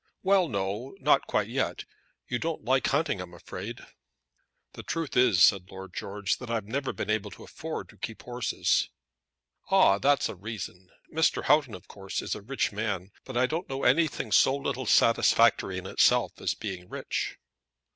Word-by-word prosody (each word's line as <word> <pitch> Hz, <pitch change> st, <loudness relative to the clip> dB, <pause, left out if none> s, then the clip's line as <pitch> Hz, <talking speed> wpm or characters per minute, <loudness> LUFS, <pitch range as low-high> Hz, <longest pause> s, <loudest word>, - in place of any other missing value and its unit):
"Well, 190 Hz, -2 st, +4 dB
no; 100 Hz, +4 st, -3 dB
not -, -, +3 dB
quite -, -, 0 dB
yet. -, -, -2 dB, 0.4 s
You 125 Hz, -, -2 dB
don't 165 Hz, -8 st, -3 dB
like 130 Hz, +1 st, +2 dB
hunting, 145 Hz, -, 0 dB
I'm 90 Hz, -1 st, -9 dB
afraid?" 85 Hz, -, -7 dB, 0.9 s
"The -, -, -8 dB
truth 165 Hz, -5 st, -4 dB
is," 115 Hz, -8 st, +5 dB
said 95 Hz, -1 st, +4 dB
Lord 95 Hz, -1 st, -10 dB
George, 100 Hz, 0 st, -2 dB
"that 125 Hz, -, -8 dB
I've 115 Hz, -3 st, -1 dB
never 135 Hz, +5 st, -2 dB
been -, -, -3 dB
able 105 Hz, -1 st, -1 dB
to -, -, -12 dB
afford 160 Hz, 0 st, -6 dB
to -, -, -17 dB
keep 115 Hz, -2 st, -6 dB
horses." 125 Hz, -1 st, 0 dB, 0.8 s
"Ah, 100 Hz, +1 st, +5 dB
that's 140 Hz, +2 st, +3 dB
a -, -, -5 dB
reason. 95 Hz, -2 st, -7 dB, 0.2 s
Mr. 160 Hz, +1 st, +2 dB
Houghton, 145 Hz, -7 st, +3 dB
of 90 Hz, +2 st, -13 dB
course, 95 Hz, -1 st, -5 dB
is -, -, -2 dB
a -, -, -6 dB
rich 130 Hz, +4 st, -1 dB
man; 105 Hz, -3 st, -3 dB
but 130 Hz, -2 st, -5 dB
I 125 Hz, -, +4 dB
don't 160 Hz, +7 st, -3 dB
know 135 Hz, 0 st, -4 dB
anything 150 Hz, -5 st, +2 dB
so 130 Hz, +6 st, +5 dB
little 135 Hz, -3 st, -3 dB
satisfactory 115 Hz, -4 st, +4 dB
in 95 Hz, -, -6 dB
itself -, -, +2 dB
as -, -, 0 dB
being 95 Hz, -4 st, -6 dB
rich." -, -, -3 dB
115 Hz, 175 wpm, -28 LUFS, 100-135 Hz, 0.9 s, is